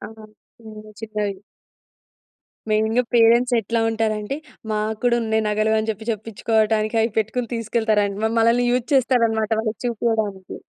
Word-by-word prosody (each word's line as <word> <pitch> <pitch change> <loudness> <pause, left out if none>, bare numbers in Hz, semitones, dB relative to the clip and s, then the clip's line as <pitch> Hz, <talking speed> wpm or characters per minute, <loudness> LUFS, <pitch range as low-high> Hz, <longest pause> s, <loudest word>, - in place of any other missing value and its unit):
ఆ! - - -7 0.5
హ్మ్. 215 -1 -12
చిన్నవి. 210 -3 -3 1.3
మెయిన్‌గా 220 +3 +2
పేరెంట్స్ 235 +2 +4
ఎట్లా 230 +2 -1
ఉంటారంటే 220 +2 -2 0.3
మాకు 215 0 -2
కూడా 240 -1 +3
ఉన్నాయి 220 0 0
నగలు 215 +1 +1
అని 220 +1 -2
చెప్పి 220 0 -6
చెప్పించుకోవడానికి 220 0 0
అవి 225 +1 +1
పెట్టుకొని 225 +2 -2
తీసుకెళ్తారన్ 220 -3 0
మ 220 - +1
మనల్ని 235 +2 +3
యూస్ 250 -1 0
చేస్తారనమాట 230 -4 +2
వాళ్ళకి 220 -1 -4
చూపియడానికి. 220 -5 -2
220 Hz, 130 wpm, -22 LUFS, 215-230 Hz, 1.3 s, పేరెంట్స్